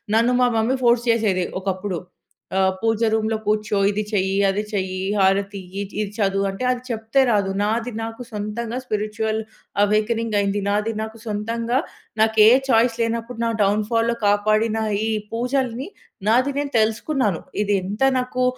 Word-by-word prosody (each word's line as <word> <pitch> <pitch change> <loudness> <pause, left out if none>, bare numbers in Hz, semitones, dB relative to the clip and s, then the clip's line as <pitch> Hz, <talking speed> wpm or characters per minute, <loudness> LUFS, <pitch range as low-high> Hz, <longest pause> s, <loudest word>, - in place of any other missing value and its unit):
నన్ను 235 +2 +3
మా 245 - +4
mummy 240 +4 +1
force 235 0 +4
చేసేది 200 -6 +1 0.2
ఒకప్పుడు. 190 -1 -2 0.6
ఆహ్, 190 0 +3
పూజ 225 -1 +1
రూమ్‌లో 220 0 +1
కూర్చో, 210 0 0
ఇది 210 +1 -1
చెయ్యి, 190 -1 +1
అది 200 +2 0
చెయ్యి, 185 -1 -2 0.2
హారతి 195 +1 +2 0.2
ఇయ్యి, - - -1 0.2
ఇది 205 -1 -3
చదువు 195 -2 +1
అంటే 195 +6 -5
అది 250 -1 0
చెప్తే 225 +3 +1
రాదు. 205 -4 +2
నాది 230 +3 0
నాకు 225 +2 -6
సొంతంగా 220 +2 -4
స్పిరిచ్యువల్ 215 -1 -2 0.4
అవేకెనింగ్ 215 +1 +1
అయింది. 200 0 0
నాది 210 +2 0
నాకు 220 +1 -6
సొంతంగా 230 +3 -1 0.4
నాకే 220 -1 +5 0.2
చాయిస్ 230 0 +4
లేనప్పుడు 230 +1 -2
నా - - +1
డౌన్‌ఫాల్‌లో 220 +3 +1
కాపాడిన 215 +2 +2 0.3
ఈ - - 0 0.2
పూజల్ని 250 +2 -1 0.4
నాది 255 +5 +3
నేను 290 -1 -3
తెలుసుకున్నాను. 220 - 0 0.2
ఇది 205 0 +1
ఎంత 205 +5 -5 0.2
నాకు 255 0 -2
220 Hz, 145 wpm, -22 LUFS, 205-230 Hz, 0.6 s, నాకే